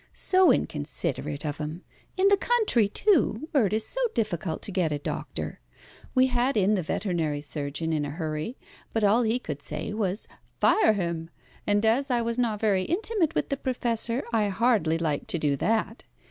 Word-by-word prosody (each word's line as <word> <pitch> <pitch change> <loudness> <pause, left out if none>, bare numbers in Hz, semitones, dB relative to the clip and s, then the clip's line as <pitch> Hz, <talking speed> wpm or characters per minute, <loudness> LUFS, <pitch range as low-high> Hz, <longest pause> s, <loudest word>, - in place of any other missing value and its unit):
So 370 -2 +4
inconsiderate 145 -1 -2
of 145 -1 -3
him. 155 +4 -5 0.3
In 380 +1 +4
the 400 - +6
country, 410 - +2
too, 310 - +2
where 260 -8 +3
it 190 - -4
is 220 0 +1
so - - -5 0.2
difficult 175 -7 -2
to - - -3
get 180 -5 0
a 150 - 0
doctor. 145 - -5 0.6
We 255 0 +6
had 250 0 +1
in 200 +1 +3
the 195 - +1
veterinary 165 -4 -1
surgeon 145 +2 -4
in 150 -2 0
a 145 - -3
hurry, 155 - -4 0.4
but 225 - 0
all 210 +4 +4
he 230 +1 +1
could 150 - -6
say 210 - -4
was 210 -1 -2 0.3
'Fire 430 - +5
him!' 170 -4 -3 0.4
and 205 +1 +2
as 255 +6 +2
I 245 -2 +2
was 235 +1 -2
not 225 -4 0
very 205 -4 +2
intimate 360 -2 0
with - - 0
the 275 - -1
Professor, 240 -1 -1
I 215 -2 +3
hardly 200 -6 +2
liked 155 -3 -2
to - - 0
do 150 -3 +1
that. 225 - 0
210 Hz, 185 wpm, -27 LUFS, 160-245 Hz, 0.6 s, the